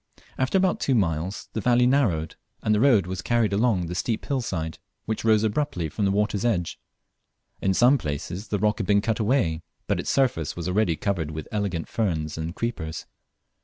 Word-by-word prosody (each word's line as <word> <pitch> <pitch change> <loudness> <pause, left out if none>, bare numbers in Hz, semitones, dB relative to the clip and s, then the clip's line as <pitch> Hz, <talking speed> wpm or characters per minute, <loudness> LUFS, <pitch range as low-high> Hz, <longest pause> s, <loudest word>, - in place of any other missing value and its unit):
After 130 +8 +1
about 185 -1 +2
two 135 - +1
miles, 90 -2 -1
the 110 - -2
valley 125 +2 +4
narrowed, 110 - +1 0.3
and 105 - +2
the 105 - +2
road 115 -7 +5
was 90 -1 -4
carried 115 +1 +1
along 100 -4 +2
the 85 - -5
steep 110 +5 -2
hill 135 -2 0
side 80 -8 -4 0.3
which 110 -1 -3
rose 110 -1 +4
abruptly 105 - -1
from 100 +7 -1
the 95 - +2
water's 105 0 0
edge. 95 -8 0 0.8
In 95 -1 +1
some 130 +6 +5
places 85 +6 -4
the 105 - -1
rock 105 +3 +1
had 100 - -2
been 100 +1 +4
cut 110 +1 -1
away, 105 -9 +1 0.2
but - - 0
its - - -3
surface 120 - +1
was 85 0 -4
already 90 -2 +2
covered 90 -4 -2
with 80 -1 -6
elegant 100 -6 -2
ferns 80 -9 -1
and 80 +2 -4
creepers. 85 -9 -4
100 Hz, 195 wpm, -25 LUFS, 85-115 Hz, 0.8 s, road